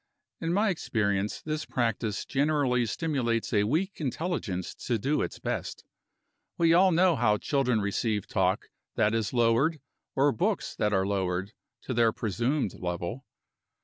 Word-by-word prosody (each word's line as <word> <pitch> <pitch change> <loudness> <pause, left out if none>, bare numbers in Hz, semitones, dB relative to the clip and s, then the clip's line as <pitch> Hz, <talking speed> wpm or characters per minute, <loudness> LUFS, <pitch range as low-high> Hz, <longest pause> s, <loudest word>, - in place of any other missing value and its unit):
In 165 - -2
my 205 +4 +2
experience, 105 - -1
this 155 0 -2
practice 115 -3 -1
generally 135 -4 +1
stimulates 125 -7 -1
a 105 -1 +3
weak 170 - -1
intelligence 135 - -2
to 120 - +2
do 140 +8 0
its - - -3
best. - - -4 0.7
We 165 -1 +4
all 185 +2 +6
know 175 0 +4
how 110 -4 +3
children 125 -3 +1
receive 105 +1 -1
talk 95 -5 0 0.2
that 105 +1 +2
is 115 -2 0
lowered, 125 +6 +2 0.4
or 140 +2 +4
books 115 - -1
that 105 - 0
are 95 -1 +2
lowered, 95 0 -1 0.3
to 130 - -3
their 115 -1 +4
presumed 120 +3 -1
level. 90 +9 -4
120 Hz, 145 wpm, -28 LUFS, 105-150 Hz, 0.7 s, all